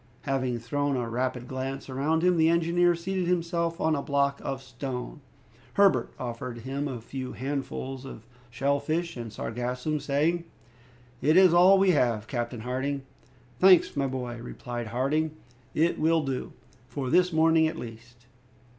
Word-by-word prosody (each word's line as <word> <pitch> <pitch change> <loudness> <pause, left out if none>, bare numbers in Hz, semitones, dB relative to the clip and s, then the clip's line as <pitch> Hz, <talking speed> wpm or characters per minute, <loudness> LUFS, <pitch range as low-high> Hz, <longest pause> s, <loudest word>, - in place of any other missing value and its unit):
Having 130 -3 -1
thrown 140 +4 -1
a 120 -2 -2
rapid 125 +1 -2
glance 135 +1 -4
around 145 +5 0
him, 180 0 +4
the 160 -1 +4
engineer 170 +1 +3
seated 180 +1 -2
himself 170 -1 0
on 160 0 +2
a 140 - -1
block 140 0 0
of 135 -1 -4
stone. 130 +2 -6 0.5
Herbert 195 -12 +4
offered 120 -1 -5
him 135 +4 -3
a 130 -4 -5
few 130 +3 -6
handfuls 135 -1 -4
of 125 -5 -10 0.2
shell 140 +4 0
fish 165 +4 -2
and 115 -3 -6
sargassum, 125 +7 -3
saying, 150 +5 0 0.8
"It 155 +5 +4
is 185 -2 +7
all 180 +3 +7
that 195 - +3
we 195 -1 +5
have, 120 -9 +1
Captain 120 -1 -3
Harding." 130 +3 -2 0.6
"Thanks, 185 -2 +6
my 140 -1 +1
boy," 125 -2 -4
replied 120 -1 -6
Harding; 150 +7 0 0.4
"it 165 +2 +2
will 160 0 +3
do 135 -2 -3 0.3
for 130 -1 -4
this 180 0 +4
morning 160 0 +4
at 155 - -4
least." 120 +1 -10
140 Hz, 155 wpm, -27 LUFS, 125-160 Hz, 0.8 s, is